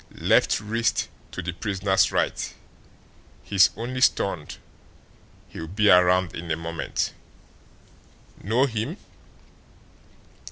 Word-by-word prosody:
Left - - +3
wrist 115 +2 -1 0.2
to - - -6
the 85 0 -4
prisoner's 95 0 +1
right. - - -1 0.9
He's 100 -2 +4
only 125 +3 -4
stunned; 90 - +1 0.9
he'll 80 - -7
be 105 +4 +3
around 90 -1 +4
in 85 0 -7
a 80 - +1
moment. 85 0 -3 1.3
Know 115 +7 +2
him?" 125 - -3
95 Hz, 95 wpm, -24 LUFS, 85-110 Hz, 1.3 s, He's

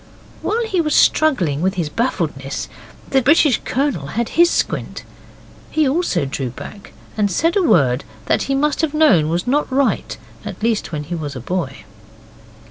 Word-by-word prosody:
While 460 +2 -1
he 380 -6 0
was 305 -2 0
struggling 185 - +3
with 190 +2 0
his 170 -4 -1
baffledness 150 - -2 0.4
the 270 - +4
British 285 -1 +4
Colonel 255 - -1
had 230 +9 -2
his 345 +1 +4
squint. - - -2 0.7
He 310 -2 +1
also 265 - 0
drew 135 -1 -3
back, 200 - -10 0.2
and 210 -2 +1
said 330 - +1
a 400 - +3
word 140 - +3 0.2
that - - +1
he 275 - +2
must 295 +3 +1
have 310 -2 -1
known 200 - +4
was 170 +2 -1
not 280 +2 0
right 270 0 0 0.3
at - - -8
least 225 -5 0
when 150 -2 -3
he 160 +4 -6
was 150 -4 -4
a - - -5
boy. 135 -1 -4
220 Hz, 170 wpm, -19 LUFS, -, 0.7 s, the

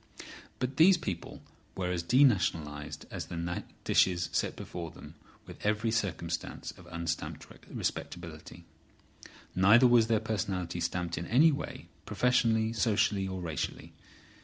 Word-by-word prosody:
But 130 +1 -3
these 175 +3 +7
people 95 - -6 0.3
were 90 -1 -2
as 90 -1 -1
denationalised 85 - +2
as - - -5
the 85 0 -3 0.2
dishes 90 -1 +3
set - - 0
before 85 -1 -6
them - - -12 0.3
with - - -12
every 105 +2 +1
circumstance 85 -7 -3
of 90 - -16
unstamped 85 -1 -4 0.2
respectability. 85 0 -5 0.9
Neither 105 +7 +6
was 120 -2 +6
their 115 -2 +3
personality 95 -5 -2
stamped 85 0 -2
in 85 - -5
any 150 +8 +6
way, 145 - -5 0.2
professionally, 115 -3 +2
socially 105 -3 +1
or 95 -1 -4
racially. 80 -5 -4
95 Hz, 125 wpm, -30 LUFS, 85-115 Hz, 0.9 s, these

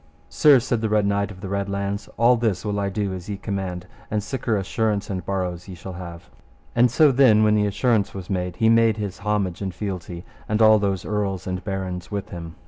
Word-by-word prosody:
Sir, 145 -3 +6
said 120 -2 -1
the 110 - 0
Red 105 -1 +2
Knight 100 0 0
of 95 -2 -11
the 100 - -5
Red 100 +1 -2
Launds, 100 +1 -3
all 120 +3 +5
this 115 -5 -1
will 100 -1 -1
I 100 -1 0
do 100 0 -2
as 90 +1 -7
ye 100 - -3
command, 95 -3 -4 0.2
and 105 - 0
siker 115 -2 -1
assurance 105 +1 -1
and 95 -2 -3
borrows 90 -1 -3
ye 95 - -8
shall 95 +2 -8
have. 85 -1 -9 0.5
And 120 +1 +5
so 145 +4 +5
then 120 -5 +5
when 105 0 +4
the 105 -1 +2
assurance 110 0 +1
was 95 -2 -8
made, 90 -2 -2
he 110 - +2
made 115 -1 +4
his 100 -3 -5
homage 100 -4 -1
and 95 -3 -4
fealty, 90 -3 -5 0.2
and 105 0 +1
all 110 -1 +6
those 100 -3 -1
earls 100 -3 -2
and 90 0 -4
barons 95 -3 -4
with 100 -1 -4
him. 85 -1 -8
100 Hz, 225 wpm, -23 LUFS, 95-110 Hz, 0.5 s, Sir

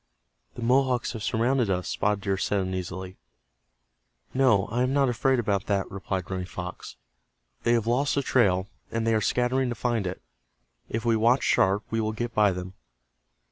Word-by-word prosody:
"The 120 - -6
Mohawks 125 0 +2
have 115 - -6
surrounded 120 +1 +1
us," 90 -1 -1
Spotted 105 -1 0
Deer 100 -1 0
said, 100 +1 0
uneasily. 95 0 -5 1.2
"No, 125 -7 +4
I 120 +2 0
am 130 +1 +1
not 140 -2 +3
afraid 130 +2 +2
about 100 -4 -1
that," 100 -2 0
replied 95 -2 -4
Running 90 -1 -3
Fox. 90 -1 -7 0.7
"They 120 - +2
have 115 -2 +1
lost 130 +5 +1
the 140 - +1
trail, 95 -8 +2 0.2
and 115 0 -2
they 115 - +2
are 110 - +2
scattering 125 +4 +1
to 120 - -3
find 115 -3 -1
it. 90 - -5 0.7
If 115 +1 -3
we 115 -1 +3
watch 120 +4 +3
sharp 100 +3 +3
we 115 0 0
will 110 0 -1
get 120 +1 -4
by 105 -2 +4
them." 90 0 -6
110 Hz, 180 wpm, -26 LUFS, 95-125 Hz, 1.2 s, No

